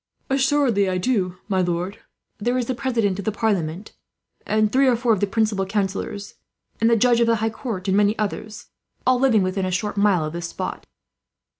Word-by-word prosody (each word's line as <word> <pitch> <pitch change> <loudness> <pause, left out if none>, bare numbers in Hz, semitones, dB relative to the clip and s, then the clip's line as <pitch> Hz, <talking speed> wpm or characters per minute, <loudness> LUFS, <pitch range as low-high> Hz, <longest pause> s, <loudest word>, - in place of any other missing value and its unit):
"Assuredly 265 -7 +2
I 185 - 0
do, 185 -4 0
my 190 -3 +1
lord. 180 +3 -2 0.4
There 245 +4 0
is 250 - 0
the 255 - -1
President 230 -7 0
of 200 - -5
the 215 - +1
Parliament, 195 -4 -2 0.6
and 215 0 +2
three 270 +1 +4
or 250 - +4
four 235 0 +2
of 210 - 0
the 205 - +1
principal 215 -1 0
councillors, 200 0 -3 0.5
and 225 - +4
the 235 - +5
Judge 240 +1 +4
of 235 - +3
the 230 - +4
High 220 0 -1
Court, 220 -5 -5
and 190 - +2
many 205 +1 +3
others, 215 0 -4 0.4
all 255 -1 +3
living 240 -6 +4
within 185 +1 -1
a - - -1
short 205 +3 -2
mile 200 -6 +3
of 155 - -5
this 170 0 -4
spot." - - -5
210 Hz, 200 wpm, -22 LUFS, 190-235 Hz, 0.6 s, the